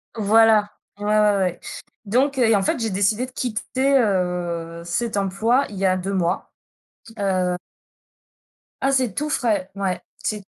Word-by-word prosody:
Voilà. 220 0 +4 0.3
Ouais, 205 - -5
ouais, 210 -1 +3
ouais. 180 -2 -1 0.5
Donc, 265 +6 +1
heu, - - +4
et 225 - +4
en 195 - +1
fait, 195 - 0
j'ai 225 -1 -1
décidé 205 +5 +1
de 255 - -13
quitter, 260 +3 0
heu, 175 -5 -1
cet 210 +6 -2
emploi 215 +7 +1
il 205 - -9
y 195 - 0
a 185 0 +3
2 190 +2 -3
mois. 180 -1 -1 0.7
Heu 185 -2 0 1.3
Ah 270 - +2
c'est 255 -6 +1
tout 300 +8 -2
frais, 215 -9 0
ouais, 195 -2 -2 0.2
c'est 210 -2 -3
205 Hz, 160 wpm, -22 LUFS, 185-230 Hz, 1.3 s, Voilà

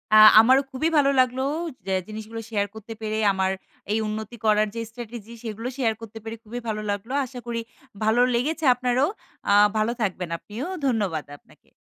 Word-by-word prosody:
আ - - +9 0.2
আমারও 260 +5 +6
খুবই 290 +5 0
ভালো 280 -1 +5
লাগলো 255 +1 +2 0.4
যে 190 - 0
জিনিসগুলো 220 +1 -7
শেয়ার 205 -2 0
করতে 220 +1 -8
পেরে 215 0 -2
আমার 190 0 +1 0.4
এই 220 - +2
উন্নতি 220 +2 -5
করার 215 0 +4
যে 230 - -2
strategy 230 -1 -9
সেগুলো 225 +1 -5
শেয়ার 235 -5 +2
করতে 225 -1 -9
পেরে 225 0 -5
খুবই 240 +2 -6
ভালো 215 -1 -2
লাগলো। 205 +5 -4
আশা 250 0 -9
করি 230 -1 -2 0.4
ভালো 220 +3 +3
লেগেছে 310 +6 -1
আপনারও। 250 +2 +1 0.4
আ - - +6 0.2
ভালো 215 +2 +2
থাকবেন 185 -4 -1
আপনিও। 215 +9 -7 0.2
ধন্যবাদ 200 - 0
আপনাকে। - - -25
225 Hz, 170 wpm, -25 LUFS, 215-245 Hz, 0.4 s, আ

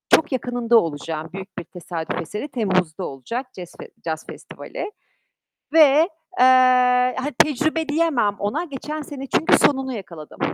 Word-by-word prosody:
çok 300 -2 -1
yakınında 245 -2 +1
olacağım. 160 -2 -2
Büyük 195 0 -9
bir - - -6
tesadüf 175 -1 -5
eseri 210 - -5
Temmuz'da 185 - -1
olacak 235 - -6
cez 180 -2 -10
fe - - -10 0.2
caz 160 -1 -3
festivali 425 - -8 0.8
ve, 310 +2 +6 0.3
eee, 255 - +7 0.7
hani 290 +3 -3
tecrübe 310 +3 +2
diyemem 295 -10 +1
ona. 210 +12 -1
Geçen 300 0 -6
sene, 275 -2 -8
çünkü 320 - +3
sonunu 265 -2 +2
yakaladım. 170 -8 -9
240 Hz, 135 wpm, -22 LUFS, 180-290 Hz, 0.8 s, eee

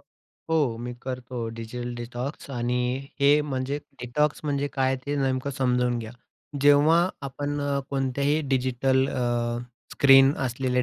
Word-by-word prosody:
हो. 150 -8 -3
मी 120 +1 -5
करतो 125 -2 -5
digital 120 +2 -5
detox 120 +5 -6
आणि 125 +1 -1
हे 145 +2 +5
म्हणजे 135 0 -2 0.2
डिटॉक्स 145 +5 0
म्हणजे 145 -1 -1
काय 130 -1 +1
ते 145 - -1
नेमकं 135 0 0
समजावून 125 -2 +1
घ्या. 115 0 -7 0.5
जेव्हा 150 +5 +5
आपण 145 +2 -3 0.3
कोणत्याही 140 +3 0
डिजिटल 130 0 +2
अ, 120 -2 -1 0.3
स्क्रीन 135 0 +7
असलेल्या 125 0 0
130 Hz, 120 wpm, -26 LUFS, 125-140 Hz, 0.5 s, स्क्रीन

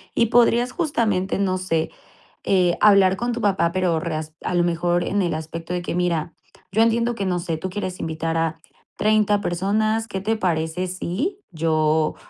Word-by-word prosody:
y 235 - +3
podrías, 240 +2 +3
justamente, 220 - 0
no 185 -2 +1
sé, 165 -4 -1 0.5
eh, 180 -3 +2
hablar 195 -3 +6
con 240 +3 -1
tu 235 - -4
papá, 185 -5 +2
pero 180 -3 +1
reas 155 -1 -4
a - - -2
lo 175 - +3
mejor, 175 0 +1
en 205 - 0
el 175 -3 0
aspecto 165 +2 -6
de 180 - -1
que, 175 - -4
mira, 170 -3 -1 0.4
yo 215 +4 +2
entiendo 230 +1 +1
que, 200 - -3
no 180 -1 0
sé, 170 -2 -3
tú 185 +4 -4
quieres 185 -1 -4
invitar 160 0 -3
a 165 0 -1 0.4
30 210 -1 +3
personas, 215 +5 0
qué 190 - -4
te 220 +3 0
parece 170 -2 -1
si 190 - -3
yo, 155 -1 +1
185 Hz, 180 wpm, -22 LUFS, 165-210 Hz, 0.5 s, hablar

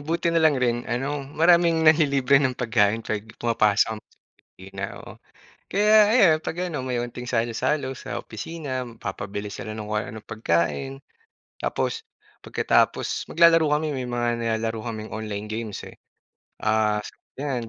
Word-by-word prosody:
buti 165 +3 -1
na 165 - +3
lang 155 -3 +4
rin 120 -1 0
ano, 135 +4 -2 0.2
maraming 170 0 +4
nanlilibre 140 -4 +4
ng 130 -3 0
pagkain 110 -2 +1
'pag 110 - -2 0.2
pumapasok 110 -2 +2
kami - - -60
sa - - -31 0.3
opisina, 95 +1 -10 0.2
oo. - - -11 0.6
Kaya 210 +2 +3
ayan, 200 -9 +5
'pag 160 - -5 0.2
ano, 150 - -2
may 130 -1 -3
onting 125 +1 -8
salo-salo 125 +4 0
sa 130 - -6
opisina, 130 +1 -5
magpapabili 100 -2 -6
sila 110 +2 -6
ng 110 - -5
kung 105 0 -1
ano-anong 110 0 -8
pagkain. 85 - -1 0.7
Tapos, 450 0 -2 0.3
pagkatapos, - - 0
maglalaro 165 -1 +5
kami, 155 +1 -1
may 125 - -4
mga 120 -1 -1
nilalaro 115 -1 -1
kaming 110 -1 -5
online 105 -1 -5
games, 110 -2 -5
eh. - - -12 0.6
Ah, 110 -1 +1
sa - - -9 0.2
yan, 130 -4 -3
120 Hz, 150 wpm, -24 LUFS, 110-150 Hz, 0.7 s, ayan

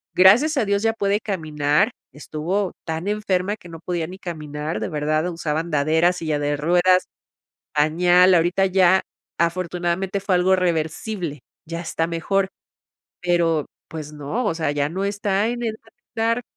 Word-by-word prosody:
gracias 230 +13 +6
a 250 - +2
Dios 200 +1 0
ya 225 0 +2
puede 205 -2 0
caminar. 155 0 0 0.2
Estuvo 175 +6 -2
tan 160 +3 -3
enferma 205 -2 0
que 180 - -14
no 165 -1 -9
podía 170 -1 -3
ni 185 +2 -10
caminar, 155 -3 -5
de - - -2
verdad, 155 +1 0
usaba 160 -2 -2
andadera, 160 +2 +2
silla 155 -4 -2
de 145 0 0
ruedas, 180 +4 +3 0.7
pañal. 175 +5 +5
Ahorita 175 +3 +3
ya 190 0 +4 0.4
afortunadamente 180 +2 -1
fue 195 -1 0
algo 185 +1 +3
reversible. 170 - -2 0.3
Ya 165 +1 -4
está 165 -1 -1
mejor. 190 +4 0 0.7
Pero 170 -3 +2 0.2
pues 155 -2 -7
no, 150 - -3
o 165 - +1
sea, 160 -3 -1
ya 145 0 0
no 190 +4 -2
está 200 0 0
en 240 0 -3
edad 225 -1 -1
de 225 +5 -25
estar, 230 +1 0
175 Hz, 155 wpm, -22 LUFS, 160-195 Hz, 0.7 s, gracias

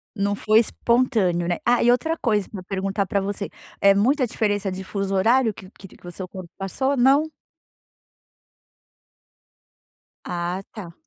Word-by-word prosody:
Não 200 +1 0
foi 215 +2 +3
espontâneo, 225 -7 +1
né, 175 - 0
ah, 240 0 +3
e 240 - +4
outra 320 +7 +2
coisa, 210 -5 0
pra 195 - -7
perguntar 195 +1 -2
pra 200 +1 -1
você 200 +1 -4 0.3
é 200 0 +5
muita 255 +5 +2
diferença 205 -3 -1
de 190 +1 -5
fuso 195 0 -3
horário 225 +3 +3
que 190 -1 -13
que 195 - -13
te - - -18
que - - -19
o - - -6
seu 180 +1 -7
corpo 180 -2 -9
passou, 265 +8 -1
não? 280 +5 +4 2.9
Ah 175 +2 -3
tá. 175 -6 -9
200 Hz, 155 wpm, -23 LUFS, 190-240 Hz, 2.9 s, é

